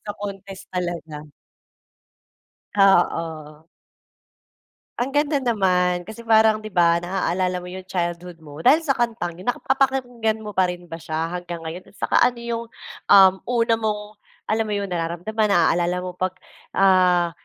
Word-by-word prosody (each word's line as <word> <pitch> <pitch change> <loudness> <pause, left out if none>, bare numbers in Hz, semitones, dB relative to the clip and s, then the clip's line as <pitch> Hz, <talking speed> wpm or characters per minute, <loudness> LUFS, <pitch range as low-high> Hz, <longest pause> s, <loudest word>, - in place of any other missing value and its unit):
sa 210 - -5
contest 195 -1 -8
talaga. 170 -4 -4 1.5
Ah, 195 -3 +5
oh. 155 -1 -7 1.3
Ang 255 +3 -1
ganda 290 0 +2
naman. 180 -7 +1
Kasi 220 +5 -10
parang 220 -1 +5
'di 215 - -8
ba 170 -2 +3
naaalala 180 0 -1
mo - - -8
'yong 185 0 -9
childhood 175 -1 -4
mo 145 0 -11
dahil 295 - +4
sa 285 - +1
kantang 225 -8 -2
'yun. 185 - -11
Nakapapakinggan 245 -4 0
mo 210 - -6
pa 185 -2 +2
rin 175 0 -6
ba 165 - -6
siya 160 +1 -3
hanggang 175 -1 -8
ngayon, 170 +4 -7
at 195 - -20
saka - - +1
ano 245 -1 +2
'yong, 235 0 -4 0.5
um, 190 -2 +8
una 235 -1 +2
mong 215 -2 -1 0.5
alam 220 0 +1
mo 210 - -2
'yon 200 -2 -3
nararamdaman 175 +6 -1
naaalala 175 -1 +2
mo 180 - -4
'pag, 185 0 -2 0.4
ah, 180 -3 +4
185 Hz, 150 wpm, -22 LUFS, 175-220 Hz, 1.5 s, um